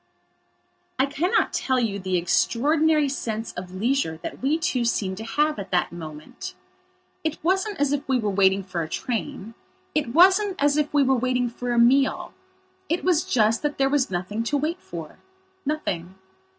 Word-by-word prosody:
I 265 - +3
cannot 300 +6 0
tell 260 -1 +1
you 210 -4 -1
the 185 -1 -1
extraordinary 300 - +2
sense 225 -5 -4
of 180 0 -8
leisure 225 -5 0
that - - -6
we 280 +5 +2
two 325 -7 0
seemed 195 -5 -1
to 220 - -6
have 295 +6 0
at 195 -1 -6
that 180 -1 +1
moment. 155 - -8 0.7
It 315 -1 -1
wasn't 385 +4 0
as 285 -1 +2
if 285 -1 -3
we 260 - +3
were 210 -4 -1
waiting 195 0 +3
for 180 -2 -4
a 160 - -4
train, 235 -2 -4 0.4
it 300 -4 0
wasn't 380 - +5
as 285 0 +3
if 300 -1 0
we 290 -1 +4
were 265 0 +3
waiting 250 0 0
for 245 +1 -4
a 240 - 0
mealit 260 +4 +3 0.7
was 350 -3 +3
just 225 -1 +2
that 295 -1 -2
there 270 0 +2
was 280 -2 +1
nothing 185 +4 -3
to 290 +4 +1
wait 320 +5 -2
for. 165 -3 -9 0.5
Nothing. 190 - -3
250 Hz, 175 wpm, -24 LUFS, 195-295 Hz, 0.7 s, wasn't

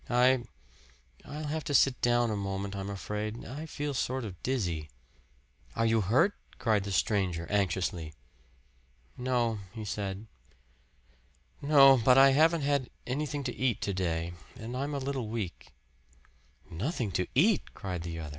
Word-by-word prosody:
"I 125 0 +4 0.8
I'll 150 +3 -6
have 155 +1 -2
to 145 - 0
sit 130 -1 +4
down 120 -1 +3
a - - -1
moment, 100 0 -3
I'm 100 0 -4
afraid. 105 +3 -4
I 145 +7 -6
feel 145 -1 -3
sort 130 -1 -1
of 95 -4 -8
dizzy." 90 -12 -2 0.9
"Are 115 - +1
you 115 -1 +3
hurt?" 125 - +3 0.2
cried 105 -4 +1
the 100 - -4
stranger 95 -4 0
anxiously. 90 -5 -1 1.0
"No," 120 -3 0
he 110 -1 -6
said 100 0 -4 1.4
"no, 140 -2 +7
but 130 +1 +6
I 135 0 +8
haven't 160 +4 +4
had 140 -2 0 0.2
anything 145 +2 -2
to 125 -2 -3
eat 125 -5 0
to 100 - -1
day, 85 -2 -2 0.2
and 115 +3 -7
I'm 140 +3 -2
a - - 0
little 135 -3 -3
weak." 105 -5 -5 1.0
"Nothing 115 - -3
to 90 - -1
eat!" 190 - +3
cried 90 -3 -4
the 85 -1 -5
other. 75 - -6
115 Hz, 150 wpm, -30 LUFS, 95-135 Hz, 1.4 s, I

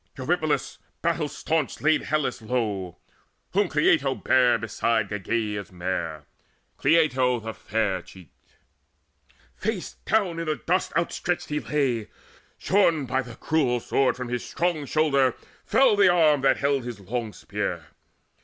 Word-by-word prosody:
Eurypylus 155 +2 -1 0.2
battle 170 -2 +1
staunch 160 +2 -2
laid 155 0 +3
Hellus 145 -6 -1
low, 105 -6 -2 0.6
Whom - - +2
Cleito - - +2
bare 125 -2 +3
beside 110 -1 0
Gygaea's 105 0 -2
mere, 85 -4 -4 0.5
Cleito 130 -7 +3
the 110 0 -6
fair 105 -3 -1
cheeked. 90 -2 -18 1.0
Face 210 -3 -4
down 190 -6 +1
in 165 - -3
the 155 - +1
dust 180 +4 -1
Outstretched 170 +1 -1
he 150 0 -1
lay: 130 -9 -1 0.5
shorn 170 -7 +2
by 130 +1 0
the 120 -3 -10
cruel 130 -5 +1
sword 135 +3 +1
From 125 -1 -5
his 125 -1 -2
strong 165 -4 -1
shoulder 140 -5 +2 0.3
fell 260 -5 +5
the 200 -2 +5
arm 155 -5 +4
that 135 - +3
held 140 -2 +1
His 120 -3 -6
long 110 +3 -4
spear. 85 - -4
130 Hz, 135 wpm, -25 LUFS, 110-160 Hz, 1.0 s, fell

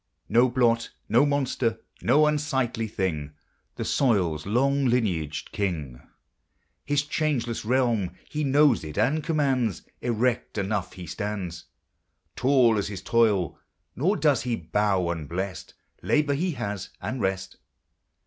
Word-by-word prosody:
No 120 +3 +4
blot, 120 -2 +2 0.2
no 120 +7 +5
monster, 130 -5 0 0.2
no 145 +6 +4
unsightly 135 -7 0
thing, 80 -8 -3 0.4
The - - -4
soil's 95 - +1
long 135 +5 +2
lineaged 90 -12 -1
king; 80 - -3 0.8
His 145 0 +1
changeless 145 -7 -1
realm, 115 -6 +1
he 150 0 -3
knows 140 - +4
it 75 -1 -7
and 135 +9 +2
commands; 135 - 0 0.2
Erect 120 0 0
enough 100 -1 -2
he 90 -2 -8
stands, 90 -2 -4 0.7
Tall 125 -5 +4
as 100 - -2
his 100 -3 -6
toil. 105 -8 +2 0.4
Nor 185 +10 +1
does 145 -6 +3
he 125 -2 -1
bow 95 +1 0
unblest: 85 +4 -5 0.3
Labor 150 -1 +2
he 170 +5 0
has, 105 -7 -4
and 120 +3 -4
rest. 95 -1 -2
115 Hz, 125 wpm, -26 LUFS, 95-135 Hz, 0.8 s, no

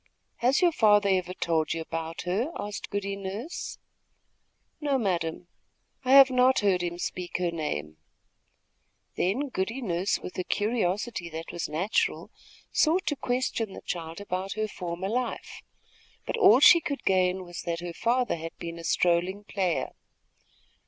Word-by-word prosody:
"Has 260 +8 +2
your 350 - +5
father 210 -7 +4
ever 185 -1 0
told 160 -1 0
you 165 - -3
about 165 0 -5
her?" 205 - -1
asked 205 0 -5
Goody 200 -1 -2
Nurse. 200 - -6 1.0
"No, 290 -3 +1
madame; 175 -6 -2 0.6
I 260 +1 +3
have 275 -1 +9
not 255 0 +4
heard 190 -3 +2
him 175 0 -3
speak 175 0 -4
her 175 -1 0
name." 80 - -4 1.2
Then 255 +11 0
Goody 225 +3 -2
Nurse, 190 -5 0
with 180 - -8
a - - 0
curiosity 205 -3 -1
that 165 0 -7
was 170 - -4
natural, 180 +8 0 0.4
sought 340 +5 +2
to 290 - 0
question 245 -5 -1
the - - -9
child 165 -1 -5
about 195 -1 -3
her 215 0 -1
former 180 -2 -5
life; 245 +4 -3 0.6
but - - -2
all 260 - +7
she 335 +4 +8
could 285 -2 -4
gain 185 0 +2
was 175 -1 -7
that 170 -1 -3
her 175 -1 -5
father 240 0 +1
had 165 +1 -7
been 170 0 -6
a - - -9
strolling 180 +4 +1
player. 190 -5 -1
190 Hz, 150 wpm, -27 LUFS, 170-240 Hz, 1.2 s, have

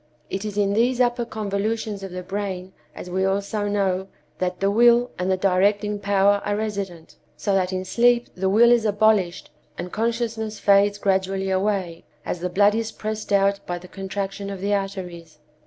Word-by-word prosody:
It 195 - -3
is 210 -1 -5
in 200 -1 +2
these 240 +4 +2
upper 240 -1 +2
convolutions 215 -1 -3
of 195 - -6
the 180 0 -6
brain, 190 -1 -4 0.2
as - - -8
we 190 +1 0
also 200 +2 -1
know, 190 -2 0 0.3
that 180 0 -2
the 195 0 +2
will 240 +2 +4
and 180 +1 -1
the 190 - +2
directing 200 +2 +1
power 200 0 +3
are 205 - -1
resident; 200 -6 -5 0.2
so 200 - -1
that 185 -1 +1
in 185 0 -3
sleep 240 +4 +3
the 190 +1 -1
will 235 +4 +6
is 240 -2 +4
abolished 205 -6 +2 0.3
and 180 - -5
consciousness 225 -1 -2
fades 200 0 +4
gradually 190 -1 0
away, 190 -3 -1 0.2
as 180 - -3
the 180 +1 -2
blood 205 +3 +4
is 225 0 -2
pressed 215 -1 -5
out 200 0 +3
by 175 - -2
the 180 +1 -11
contraction 195 +1 -5
of 195 -1 -6
the 200 +2 -1
arteries. 180 -5 -4
200 Hz, 180 wpm, -23 LUFS, 190-215 Hz, 0.3 s, will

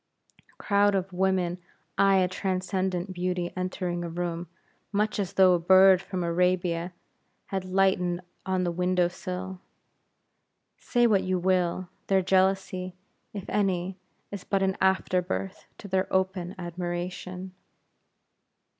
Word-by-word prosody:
A - - -16
crowd 205 -1 +3
of 190 0 -2
women 185 -1 +1 0.4
eye 195 0 +4
a 185 -1 +3
transcendent 185 0 -2
beauty 180 -1 -2
entering 180 -1 -3
a 170 - -4
room, 170 0 -3 0.4
much 210 +1 0
as 195 -1 -2
though 190 -2 +6
a 175 - +2
bird 190 +2 +6
from 185 -2 -4
Arabia 175 0 +1 0.6
had 190 -1 -1
lighted 185 -2 +1 0.2
on 185 -1 0
the 175 - 0
window 180 0 +1
sill. 185 +1 -6 1.2
Say 240 -1 +2
what 210 -5 +4
you 185 0 0
will, 180 0 0 0.2
their 190 -1 +3
jealousy 185 -1 +1 0.4
if 200 -3 -7
any 190 -2 0 0.4
is 200 -2 -6
but 195 -1 0
an 190 0 +1
afterbirth 190 0 0
to 205 - -10
their 190 0 0
open 190 -1 -1
admiration. 180 +1 -5
185 Hz, 130 wpm, -27 LUFS, 180-190 Hz, 1.2 s, though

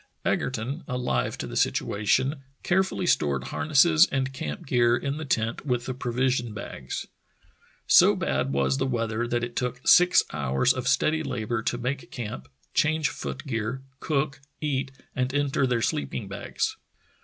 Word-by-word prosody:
Egerton, 130 +6 -1
alive 125 - -1
to - - -4
the - - -7
situation, 130 +7 +1 0.2
carefully 190 0 +1
stored 70 - +2
harnesses 155 +3 +5
and 135 0 -1
camp 75 - -5
gear 120 -2 +3
in 140 +3 -3
the 155 - -5
tent 115 -3 -1
with 125 -3 -1
the 130 - -3
provision 125 -2 -1
bags. 65 -10 -6 0.8
So - - +6
bad 65 0 -1
was 70 - +1
the 135 - +1
weather 115 -2 -1
that 120 0 -1
it 120 0 -4
took 125 0 -3
six 180 0 +7
hours 70 - +2
of 125 -1 -4
steady 155 +4 +2
labor 120 -5 -2
to 120 - -1
make 130 +3 -3
camp, 105 - -6 0.3
change 155 -1 +2
foot 135 - -6
gear, 120 +1 -3 0.2
cook, 140 -2 -1 0.2
eat, 140 -3 -1 0.2
and 130 0 0
enter 140 -2 +1
their 120 -2 0
sleeping 70 -2 -2
bags. - - -3
125 Hz, 155 wpm, -26 LUFS, 115-140 Hz, 0.8 s, six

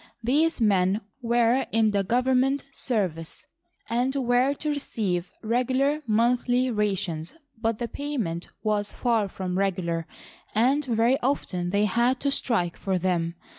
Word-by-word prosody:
These 300 +7 +2
men 200 -2 +2 0.2
were 240 +2 +2
in 220 -1 +3
the 200 -1 +1
government 255 +5 +1
service, 185 - -2 0.4
and 250 +4 0
were 255 +1 +2
to 300 - -3
receive 205 -11 -2
regular 255 +6 +1
monthly 245 +3 +2
rations; 195 - -2 0.2
but 225 -1 -1
the 240 - -3
pay 290 +4 -5
ment 170 -6 -2 0.2
was 210 -1 0
far 230 -4 +1
from 185 0 -3
regular, 175 -4 -1 0.5
and 260 +7 +3
very 240 +1 +2
often 190 -10 -1
thev 205 +2 +2
had 240 +5 +2
to 280 - +1
strike 180 -11 0
for 190 -1 -1
them. 170 -2 -1
230 Hz, 135 wpm, -26 LUFS, 190-255 Hz, 0.5 s, in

